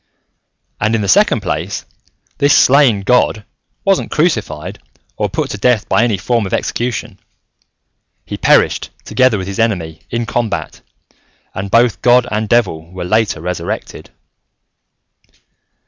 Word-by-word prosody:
"And, 110 Hz, +2 st, +1 dB
in 110 Hz, -, 0 dB
the 100 Hz, -, -2 dB
second 95 Hz, -, +3 dB
place, -, -, -3 dB, 0.5 s
this 145 Hz, 0 st, +4 dB
slain 130 Hz, -7 st, +4 dB
god 110 Hz, -1 st, +1 dB, 0.4 s
wasn't 195 Hz, -1 st, +1 dB
crucified, 110 Hz, -, -1 dB, 0.4 s
or -, -, -1 dB
put -, -, -3 dB
to 105 Hz, -, -5 dB
death 120 Hz, -1 st, +2 dB
by -, -, +2 dB
any 115 Hz, -4 st, +1 dB
form 115 Hz, +2 st, -1 dB
of -, -, 0 dB
execution: 120 Hz, 0 st, -3 dB, 1.1 s
he -, -, -5 dB
perished, -, -, +2 dB, 0.2 s
together 125 Hz, 0 st, +2 dB
with 95 Hz, -, -4 dB
his 100 Hz, +2 st, -6 dB
enemy, 85 Hz, -8 st, -1 dB
in 120 Hz, 0 st, -2 dB
combat, 115 Hz, -4 st, -3 dB, 0.7 s
and 100 Hz, +1 st, -5 dB
both 115 Hz, +1 st, +3 dB
god 125 Hz, 0 st, +4 dB
and 105 Hz, 0 st, -2 dB
devil 90 Hz, -9 st, 0 dB
were 90 Hz, -1 st, -6 dB
later 110 Hz, -3 st, 0 dB
resurrected." 90 Hz, +2 st, -5 dB
110 Hz, 130 wpm, -16 LUFS, 95-120 Hz, 1.1 s, this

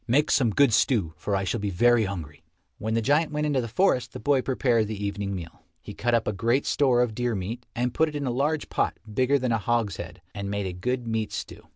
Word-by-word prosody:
Make 145 Hz, +6 st, +3 dB
some 125 Hz, -5 st, +3 dB
good 130 Hz, +2 st, +4 dB
stew, 100 Hz, -, +2 dB
for 100 Hz, +6 st, -2 dB
I 95 Hz, -, 0 dB
shall 115 Hz, +5 st, -1 dB
be 100 Hz, 0 st, -2 dB
very 120 Hz, +4 st, +4 dB
hungry." 80 Hz, -7 st, -6 dB, 0.4 s
When 110 Hz, +1 st, -2 dB
the 115 Hz, -, +1 dB
giant 150 Hz, +5 st, +2 dB
went 150 Hz, 0 st, -1 dB
into 145 Hz, -3 st, +1 dB
the 115 Hz, -, -4 dB
forest 125 Hz, -, +1 dB
the -, -, -6 dB
boy 135 Hz, +3 st, +2 dB
prepared 125 Hz, -4 st, +1 dB
the 105 Hz, -1 st, -4 dB
evening 100 Hz, -1 st, -3 dB
meal. 85 Hz, -3 st, -8 dB, 0.2 s
He -, -, -9 dB
cut 120 Hz, +2 st, +1 dB
up 115 Hz, -, 0 dB
a 105 Hz, -, 0 dB
great 115 Hz, +7 st, +1 dB
store 125 Hz, -4 st, +3 dB
of 120 Hz, -3 st, -2 dB
deer 120 Hz, 0 st, -1 dB
meat 110 Hz, +6 st, -5 dB
and 125 Hz, +1 st, -1 dB
put 160 Hz, +4 st, +2 dB
it 150 Hz, -, -9 dB
in 145 Hz, -1 st, -2 dB
a 125 Hz, -, 0 dB
large 145 Hz, +5 st, -1 dB
pot -, -, 0 dB, 0.2 s
bigger 130 Hz, +5 st, +3 dB
than 130 Hz, -2 st, -1 dB
a 115 Hz, -, +2 dB
hogshead, 95 Hz, -6 st, -2 dB
and 100 Hz, -1 st, -5 dB
made 100 Hz, 0 st, -2 dB
a 95 Hz, -, -3 dB
good 125 Hz, +7 st, -2 dB
meat 110 Hz, -2 st, -2 dB
stew. -, -, -7 dB
115 Hz, 250 wpm, -26 LUFS, 100-130 Hz, 0.4 s, good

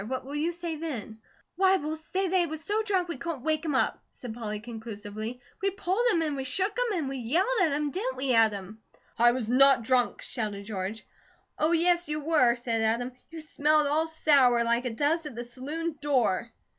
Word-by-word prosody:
What 260 Hz, +1 st, -4 dB
will 280 Hz, -, -7 dB
you 305 Hz, +4 st, 0 dB
say 340 Hz, -2 st, -5 dB
then?" 245 Hz, -9 st, -6 dB, 0.4 s
"Why, 380 Hz, 0 st, +5 dB
we'll 310 Hz, -2 st, -3 dB
say 370 Hz, +5 st, -2 dB
that 370 Hz, -, -1 dB
he 350 Hz, -2 st, +3 dB
was 315 Hz, 0 st, -6 dB
so 420 Hz, +5 st, 0 dB
drunk 385 Hz, -5 st, 0 dB
we 340 Hz, -, -4 dB
couldn't 330 Hz, -7 st, -4 dB
wake 310 Hz, 0 st, 0 dB
him 305 Hz, -4 st, -1 dB
up," -, -, +1 dB
said 245 Hz, -3 st, -8 dB
Polly 215 Hz, -2 st, -4 dB
conclusively. 220 Hz, 0 st, -7 dB, 0.2 s
"We 395 Hz, -, +2 dB
pulled 390 Hz, +2 st, -1 dB
him, 335 Hz, -5 st, +2 dB
an' 300 Hz, -2 st, -1 dB
we 270 Hz, -, -3 dB
shook 380 Hz, +9 st, 0 dB
him, 480 Hz, -5 st, 0 dB
an' 305 Hz, -5 st, -2 dB
we 270 Hz, 0 st, -4 dB
yelled 275 Hz, -, +1 dB
at 330 Hz, -5 st, +3 dB
him. 290 Hz, 0 st, -1 dB
Didn't 465 Hz, -, -3 dB
we, 265 Hz, -1 st, 0 dB
Adam?" 215 Hz, -2 st, +1 dB, 0.4 s
"I 240 Hz, +1 st, +6 dB
was 240 Hz, -3 st, -3 dB
not 265 Hz, 0 st, +5 dB
drunk!" 250 Hz, 0 st, +1 dB
shouted 210 Hz, -4 st, -4 dB
George. 205 Hz, +1 st, -5 dB, 0.5 s
"Oh, 310 Hz, +2 st, +2 dB
yes, 345 Hz, 0 st, +2 dB
you 300 Hz, 0 st, -1 dB
were," 295 Hz, -6 st, +3 dB
said 235 Hz, -2 st, -2 dB
Adam. 230 Hz, +3 st, 0 dB, 0.2 s
"You 325 Hz, 0 st, -8 dB
smelled 305 Hz, 0 st, +2 dB
all 305 Hz, +3 st, +1 dB
sour, 275 Hz, -7 st, +4 dB
like 235 Hz, +2 st, +1 dB
it 235 Hz, -3 st, -3 dB
does 305 Hz, +4 st, +1 dB
at 280 Hz, -, -9 dB
the 240 Hz, -, -4 dB
saloon 295 Hz, +6 st, -5 dB
door!" 240 Hz, -6 st, +1 dB
285 Hz, 210 wpm, -28 LUFS, 235-330 Hz, 0.5 s, I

